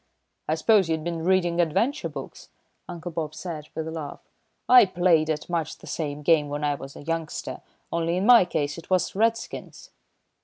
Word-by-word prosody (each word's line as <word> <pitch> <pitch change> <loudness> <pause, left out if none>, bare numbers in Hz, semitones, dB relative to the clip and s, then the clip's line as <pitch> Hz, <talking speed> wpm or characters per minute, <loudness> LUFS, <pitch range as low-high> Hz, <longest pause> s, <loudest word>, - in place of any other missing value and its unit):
"I 155 - +1
suppose 200 0 +3
you'd 160 -1 -1
been 170 -1 -3
reading 175 -1 +2
adventure 195 - 0
books," - - -9 0.4
Uncle 175 0 -6
Bob 155 -2 -4
said, 160 -3 -6
with 160 0 -3
a - - -4
laugh. 155 -3 -6 0.5
"I 250 -4 +8
played 175 -4 +2
at 155 -1 -2
much 170 -3 -2
the - - -15
same 150 -2 -4
game 150 -2 +3
when 145 +1 -4
I 145 -1 +2
was 135 -1 -9
a - - -10
youngster, 165 0 -4 0.3
only 170 +1 0
in 190 - 0
my 235 -5 +8
case 150 -2 -2
it 165 - -15
was 185 -1 +1
Redskins." 225 +3 -2
165 Hz, 185 wpm, -25 LUFS, 155-180 Hz, 0.5 s, I